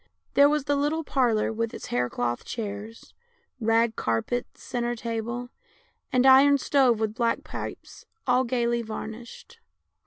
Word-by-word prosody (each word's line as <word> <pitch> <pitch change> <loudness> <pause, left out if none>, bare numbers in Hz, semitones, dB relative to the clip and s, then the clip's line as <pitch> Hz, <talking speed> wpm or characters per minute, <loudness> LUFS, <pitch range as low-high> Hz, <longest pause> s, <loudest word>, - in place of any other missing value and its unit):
There 285 +1 +6
was 300 -1 +1
the 285 0 +1
little 295 +3 0
parlour 240 -7 +1
with 230 0 -2
its - - -8
hair 125 0 +1
cloth 120 0 -2
chairs, 215 0 -7 0.5
rag 225 0 +2
carpet, 115 - -1
centre 240 -1 -3
table, 235 +2 -4 0.6
and 255 -1 +3
iron 275 +2 +7
stove 260 -4 +3
with 220 -1 -1
black 235 0 0
pipes, - - -8 0.2
all 250 -1 +3
gaily 235 -1 0
varnished. 225 - -8
235 Hz, 135 wpm, -26 LUFS, 220-260 Hz, 0.6 s, iron